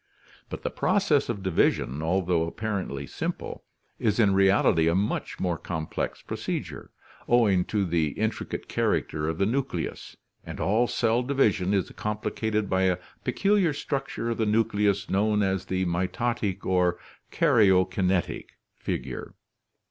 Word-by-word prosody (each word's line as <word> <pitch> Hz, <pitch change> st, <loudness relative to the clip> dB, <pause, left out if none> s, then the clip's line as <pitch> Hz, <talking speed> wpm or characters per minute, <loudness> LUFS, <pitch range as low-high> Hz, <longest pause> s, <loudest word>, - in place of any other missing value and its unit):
But -, -, -7 dB
the -, -, -2 dB
process 155 Hz, -11 st, +2 dB
of 105 Hz, -5 st, -3 dB
division, 75 Hz, -6 st, +1 dB
although 85 Hz, 0 st, +1 dB
apparently 95 Hz, -8 st, -3 dB
simple, -, -, -5 dB, 0.4 s
is 105 Hz, 0 st, +1 dB
in 100 Hz, -4 st, +4 dB
reality 95 Hz, -4 st, +4 dB
a 85 Hz, -, +3 dB
much 100 Hz, +3 st, -1 dB
more 85 Hz, -3 st, -1 dB
complex 80 Hz, -3 st, -4 dB
procedure, -, -, -5 dB, 0.4 s
owing 105 Hz, -7 st, +4 dB
to 105 Hz, -3 st, 0 dB
the 85 Hz, -3 st, +1 dB
intricate 110 Hz, +1 st, -3 dB
character 75 Hz, 0 st, 0 dB
of 80 Hz, -, -3 dB
the 100 Hz, -, +2 dB
nucleus, 120 Hz, -6 st, -3 dB, 0.3 s
and -, -, -8 dB
all 110 Hz, +5 st, +2 dB
cell 115 Hz, 0 st, +1 dB
division 110 Hz, -8 st, +1 dB
is 95 Hz, -3 st, 0 dB
complicated 105 Hz, 0 st, -2 dB
by 95 Hz, 0 st, +2 dB
a 90 Hz, -1 st, +2 dB, 0.3 s
peculiar 190 Hz, +5 st, +2 dB
structure 135 Hz, -4 st, -3 dB
of 115 Hz, -, -2 dB
the 110 Hz, -, +1 dB
nucleus 105 Hz, -2 st, +1 dB
known 105 Hz, +1 st, +2 dB
as 95 Hz, -1 st, 0 dB
the 95 Hz, 0 st, -1 dB
mitotic 95 Hz, +4 st, -1 dB
or 90 Hz, -1 st, +2 dB, 0.3 s
karyo 105 Hz, -, +4 dB
kinetic 95 Hz, -1 st, -1 dB, 0.2 s
figure. -, -, -5 dB
100 Hz, 135 wpm, -26 LUFS, 90-115 Hz, 0.4 s, in